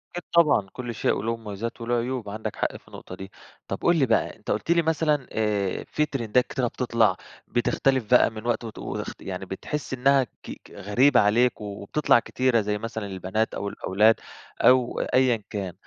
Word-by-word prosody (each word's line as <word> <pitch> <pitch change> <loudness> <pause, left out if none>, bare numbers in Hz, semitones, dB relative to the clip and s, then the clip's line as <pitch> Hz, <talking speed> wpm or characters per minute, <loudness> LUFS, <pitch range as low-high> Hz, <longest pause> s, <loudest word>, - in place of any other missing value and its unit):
أكيد 175 - -4
طبعًا 155 -12 +4
كل 120 -2 -6
شيء - - +1
وليه 115 +3 -2
مميزات 110 +2 -6
وليه 120 +1 0
عيوب 120 -2 -2
عندك 110 +1 -5
حق - - -2
في - - -25
النقطة. 90 - -10
دي 95 +1 -9 0.4
طب - - -3
قُل 175 - +3
لي 140 - +4
بقى، 115 -3 +1
أنت 105 - -6
قُلت 110 +10 -1
لي 170 0 +4
مثلًا 155 -4 0
آآ 105 -3 -1
في 150 - +1
تريندات 125 -4 0
كتيرة 125 -2 -1
بتطلع 115 -5 +1 0.3
بتختلف 130 +2 +1
بقى 125 - +6
من 110 0 -9
وقت 120 0 0
وت 110 -2 -8
وتخت - - -6
يعني 95 0 -5
بتحس 135 +10 -5
إنّها 135 +1 +3
ك 125 - -12
ك - - -18
غريبة 125 +9 +3
عليك 115 +4 +3
و - - -5 0.2
وبتطلع 120 +5 +3
كتيرة 125 0 +1
زي 105 0 -1
مثلًا 110 0 -5
البنات 95 +3 -2
أو 100 - -3
الأولاد 105 +4 +3 0.5
أو 125 -1 +4
أيًا 125 -4 +2
كان. 95 -4 -4
115 Hz, 190 wpm, -25 LUFS, 105-130 Hz, 0.5 s, بقى